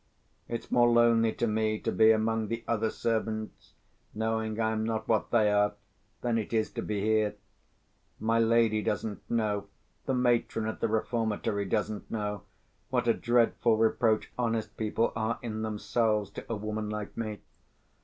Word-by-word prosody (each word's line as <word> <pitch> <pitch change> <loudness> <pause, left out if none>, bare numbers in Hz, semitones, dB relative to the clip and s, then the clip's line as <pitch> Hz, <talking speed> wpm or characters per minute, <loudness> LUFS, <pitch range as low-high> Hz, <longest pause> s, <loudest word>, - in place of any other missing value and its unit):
It's 115 - -5
more 120 -1 +5
lonely 115 -1 +4
to - - -1
me 110 -1 0
to - - -1
be 110 0 +5
among 110 0 +1
the 115 +2 -4
other 110 -1 +1
servants, 110 -1 -3 0.4
knowing 110 0 -1
I 110 -1 +2
am 110 0 -1
not 110 0 -2
what 110 -2 +1
they 110 -3 +3
are, 105 0 +3 0.5
than 120 -2 +1
it 110 - -5
is 110 -1 +1
to - - -4
be 105 -2 -2
here. 110 0 +2 0.8
My 115 +1 +2
lady 115 -1 +3
doesn't 105 0 -2
know, 105 -3 0 0.4
the 135 - +1
matron 120 -3 +1
at 110 - -4
the - - +1
reformatory 110 -2 -1
doesn't 105 +1 -2
know, 105 -3 -3 0.5
what 125 -2 0
a 115 - +5
dreadful 120 -1 +2
reproach 110 0 +2
honest 115 -3 -1
people 110 +1 0
are 110 +1 -1
in 110 -2 -4
themselves 105 -1 0
to - - -8
a - - 0
woman 105 0 -3
like 105 -1 -5
me. 110 -2 -4
110 Hz, 165 wpm, -29 LUFS, 105-115 Hz, 0.8 s, more